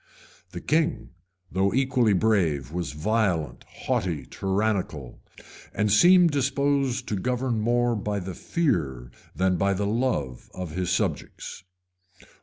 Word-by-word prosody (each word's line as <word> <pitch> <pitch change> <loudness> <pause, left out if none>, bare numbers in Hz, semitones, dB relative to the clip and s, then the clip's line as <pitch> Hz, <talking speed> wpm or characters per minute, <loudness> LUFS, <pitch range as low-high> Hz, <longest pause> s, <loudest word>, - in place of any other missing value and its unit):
The - - -8
king, 155 - 0 0.4
though 95 +3 +1
equally 130 -5 +3
brave, 85 - +1
was 85 -2 -3
violent, 90 -1 0
haughty, 85 -7 -2
tyrannical; 95 - -2 0.6
and 105 0 +1
seemed 175 - +6
disposed 140 -2 0
to 105 - 0
govern 125 +3 -1
more 120 +1 +2
by 105 0 -2
the 95 0 -6
fear 75 - -1 0.2
than 95 -1 +1
by 100 +2 +1
the 100 +2 -1
love 105 - -1
of 90 -3 -5
his 90 +2 -2
subjects. 90 -1 -3
105 Hz, 120 wpm, -25 LUFS, 90-125 Hz, 0.6 s, seemed